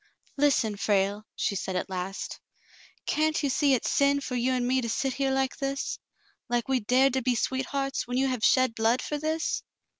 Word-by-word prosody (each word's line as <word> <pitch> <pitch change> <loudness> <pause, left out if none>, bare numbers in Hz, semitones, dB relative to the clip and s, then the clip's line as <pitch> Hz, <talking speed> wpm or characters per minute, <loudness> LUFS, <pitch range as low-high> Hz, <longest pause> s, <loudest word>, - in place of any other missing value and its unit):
"Listen, 275 -7 +2
Frale," 205 +1 0
she 200 - -1
said 190 0 -3
at 180 - -1
last. 190 0 -5 0.7
"Can't 310 0 +1
you 280 - +1
see 280 0 +3
it's 245 - -1
sin 280 0 +3
for 275 - -6
you 250 +1 +1
and 250 -1 0
me 260 +1 +2
to 235 - -3
sit 270 +3 -1
here 275 0 0
like 265 0 0
this 275 0 -3 0.2
— 410 - -38
like 240 -1 0
we 265 -1 +2
dared 255 +4 +3
to 265 - +1
be 250 0 +1
sweethearts, 270 +2 -2
when 245 +1 -2
j^ou 270 +1 +2
have 255 -4 -2
shed 255 -3 +4
blood 230 +2 +1
for 295 - -3
this 315 +2 -1
260 Hz, 205 wpm, -27 LUFS, 230-275 Hz, 0.7 s, shed